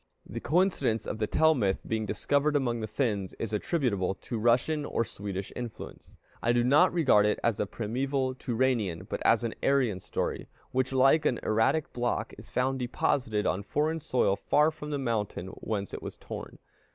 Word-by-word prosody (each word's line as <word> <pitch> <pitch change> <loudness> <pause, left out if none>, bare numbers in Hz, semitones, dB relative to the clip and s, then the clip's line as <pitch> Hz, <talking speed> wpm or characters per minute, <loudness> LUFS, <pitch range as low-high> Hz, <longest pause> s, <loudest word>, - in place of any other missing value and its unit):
The - - -6
coincidence 150 - +1
of 110 - -4
the 110 - 0
Tell 160 +6 +4
myth 100 -9 0
being 110 -1 -1
discovered 145 +7 +1
among 120 -4 +1
the 110 - -3
Finns 105 -4 -1
is 110 -1 -4
attributable 105 - 0
to 115 +4 -5
Russian 125 +7 +2
or 115 - -1
Swedish 100 -2 -6
influence. 120 -3 -8 0.3
I 120 - +2
do 120 0 +3
not 140 +5 +5
regard 130 -12 +4
it 105 - +1
as 115 -3 +1
a 105 - 0
primeval 130 +5 -1
Turanian, 115 -8 -1
but - - -4
as 115 +1 +4
an 115 - -2
Aryan 130 -9 +2
story, - - -3 0.2
which, 130 0 0
like 135 +4 +4
an 120 - 0
erratic 110 +8 +1
block, 120 0 -1
is - - -12
found 130 +1 0
deposited 120 -3 0
on 95 - 0
foreign 155 +9 -1
soil 125 -8 +1
far 150 +8 +3
from 150 -1 -8
the 145 - -1
mountain 110 -8 -2
whence 100 0 -4
it - - -5
was - - -7
torn. - - -8
120 Hz, 180 wpm, -29 LUFS, 105-140 Hz, 0.3 s, not